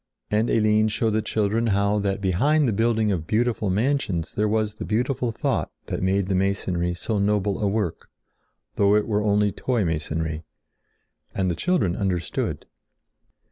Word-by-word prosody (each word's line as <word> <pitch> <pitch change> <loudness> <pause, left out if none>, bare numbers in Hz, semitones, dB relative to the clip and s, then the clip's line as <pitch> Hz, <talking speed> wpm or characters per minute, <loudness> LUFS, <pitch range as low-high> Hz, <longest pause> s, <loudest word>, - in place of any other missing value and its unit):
And 110 +2 +2
Eline 110 -1 +3
showed 110 +1 0
the 110 +1 +1
children 110 +2 0
how 100 0 +2
that 100 0 -1
behind 135 - +2
the 115 - +1
building 110 0 +1
of 85 -4 -2
beautiful 110 -2 0
mansions 100 - 0
there 105 +1 +1
was 105 0 0
the 110 - -7
beautiful 120 +2 -1
thought - - -1 0.2
that - - -4
made 95 +1 +1
the 95 - -1
masonry 90 -2 0
so 105 +4 -2
noble 100 0 0
a 105 - +2
work, 100 -4 -2 0.7
though 100 0 +4
it 105 - +1
were 105 -2 +1
only 105 0 +2
toy 120 -3 -1
masonry. 80 0 -2 0.9
And 95 -2 +1
the - - -2
children 105 - +1
understood. 90 -4 -2
105 Hz, 160 wpm, -24 LUFS, 95-110 Hz, 0.9 s, though